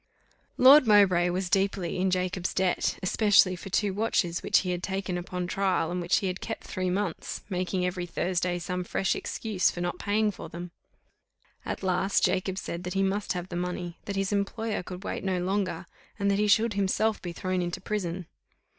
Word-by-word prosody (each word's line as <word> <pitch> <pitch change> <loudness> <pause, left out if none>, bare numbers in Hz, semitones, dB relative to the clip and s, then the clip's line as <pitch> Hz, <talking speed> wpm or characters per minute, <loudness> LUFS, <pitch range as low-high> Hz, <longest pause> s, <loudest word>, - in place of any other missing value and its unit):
Lord 265 0 +8
Mowbray 190 -4 +5
was 185 +1 -1
deeply 190 -2 0
in 190 +1 +2
Jacob's 185 0 -1
debt, 185 -1 +1
especially 195 -1 +4
for 180 - -9
two 200 +1 +1
watches 190 -5 0
which - - +3
he 185 - -2
had 180 -1 -2
taken 190 -1 -3
upon 180 0 -3
trial, 185 -2 0
and 180 0 -2
which 175 - +2
he - - -1
had 185 0 -3
kept 225 - -5
three 185 -2 -2
months, 185 -2 -3
making, 180 0 -1
every 180 -1 -2
Thursday, 175 0 -1
some 180 +1 -3
fresh 190 +1 0
excuse 215 -5 0
for - - -6
not 175 0 -2
paying 210 +1 +1
for - - -9
them; 175 +1 -7 0.9
at - - -5
last 190 +1 +2
Jacob 185 +1 0
said 170 -2 -5
that 180 +1 -5
he 195 - +2
must 195 +1 0
have 180 0 -5
the 175 - -5
money, 175 -1 -4
that 200 - -4
his 195 0 -1
employer 205 +2 -1
could 180 +1 -8
wait - - -4
no 190 -1 0
longer, 190 +1 -1 0.3
and 200 0 +1
that 200 - +1
he 210 - +2
should 220 +2 +4
himself 200 +2 +1
be 175 - -5
thrown 185 +1 -2
into 175 0 -3
prison. 185 -3 -3
185 Hz, 195 wpm, -28 LUFS, 180-200 Hz, 0.9 s, Lord